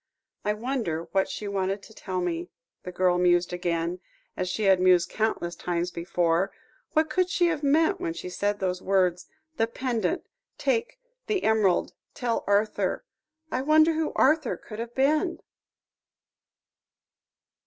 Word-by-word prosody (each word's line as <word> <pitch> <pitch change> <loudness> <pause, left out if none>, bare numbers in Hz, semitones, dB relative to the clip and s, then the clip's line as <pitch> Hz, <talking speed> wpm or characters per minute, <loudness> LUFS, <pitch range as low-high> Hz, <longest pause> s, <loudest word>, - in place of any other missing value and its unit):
"I 210 - +1
wonder 220 -9 -2
what 195 0 +1
she 210 - -5
wanted 195 0 -1
to 220 - -14
tell 185 -3 -4
me," 175 -1 -2 0.3
the 180 - -7
girl 180 -1 +2
mused 175 0 +3
again; 175 0 -1 0.4
as 185 0 -2
she 215 - -2
had 190 -2 +5
mused 180 -1 +4
countless 215 -6 -1
times 175 0 -2
before; 175 +2 0 0.4
"what 315 0 +3
could 365 +2 +1
she 355 - +2
have 310 -3 -1
meant 320 +6 +2
when 340 -2 -2
she 340 - -7
said 205 +3 -1
those 185 -2 -2
words: 185 -2 +1 0.3
"The 225 - +2
pendant 230 -5 -2 0.3
take 475 +1 -1 0.3
the 405 -3 0
emerald 215 -5 +2 0.2
tell 240 -2 -1
Arthur 210 - +1 0.2
" 315 +1 -43
"I 255 - 0
wonder 310 +3 +5
who 320 0 -1
Arthur 300 -1 +3
could 215 -1 -10
have 235 +1 -6
been." 305 +6 +2
205 Hz, 150 wpm, -27 LUFS, 180-295 Hz, 0.4 s, had